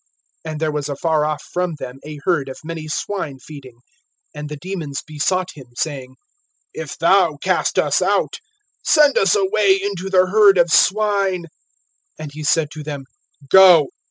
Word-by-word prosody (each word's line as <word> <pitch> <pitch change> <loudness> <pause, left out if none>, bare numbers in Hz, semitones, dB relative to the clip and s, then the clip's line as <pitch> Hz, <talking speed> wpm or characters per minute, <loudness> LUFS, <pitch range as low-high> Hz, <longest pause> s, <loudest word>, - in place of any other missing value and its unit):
(30)And 155 -1 -5
there 155 0 -1
was 150 -1 -4
afar 150 +2 0
off 150 -1 -3
from 180 -2 -1
them 130 -2 -9
a 150 0 -8
herd 155 -7 0
of 130 - -8
many 160 -1 -7
swine 155 -2 -4
feeding. 130 -3 -13 0.5
And 150 -1 -7
the 150 - -7
demons 165 -5 -6
besought 180 +5 -1
him, 135 -4 -13
saying: 130 -3 -4 0.6
(31)If - - -7
thou - - +3
cast - - -1
us - - +2
out, - - 0 0.5
send 300 -3 +4
us 195 0 +3
away 195 0 +2
into 195 -1 -4
the 185 -1 +4
herd 200 0 +5
of 175 -1 +3
swine. 195 -3 +2 0.7
(32)And 155 -2 -7
he 155 +1 -8
said 150 0 +1
to 155 - -8
them, 145 -2 -6 0.5
Go. 180 -7 +7
160 Hz, 160 wpm, -19 LUFS, 150-190 Hz, 0.7 s, Go